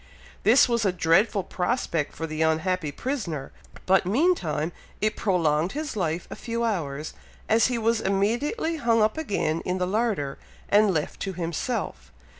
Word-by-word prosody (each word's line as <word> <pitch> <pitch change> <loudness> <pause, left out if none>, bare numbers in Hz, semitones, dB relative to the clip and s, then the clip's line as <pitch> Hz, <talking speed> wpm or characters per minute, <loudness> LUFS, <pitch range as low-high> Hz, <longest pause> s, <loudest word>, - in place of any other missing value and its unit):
This 245 +5 +6
was 235 -2 +1
a 195 - +3
dreadful 180 +4 +2
prospect 180 - -1
for 165 - -3
the 155 0 -4
unhappy 160 0 +1
prisoner; 170 - -4 0.3
but 190 +1 +4
meantime 185 - +1 0.3
it 215 +1 0
prolonged 170 -4 +1
his 300 -3 -4
life 170 -3 -2
a - - -4
few 230 0 -3
hours, 155 -9 -2 0.3
as 220 0 +4
he 250 -1 -1
was 225 0 +1
immediately 240 - 0
hung 230 -5 +3
up 215 0 +2
again 200 - -1
in 180 +1 -1
the 180 - 0
larder, 195 -9 -1 0.3
and 205 0 +5
left 155 -4 -2
to 195 - -3
himself. 175 +8 -3
195 Hz, 155 wpm, -26 LUFS, 165-230 Hz, 0.3 s, This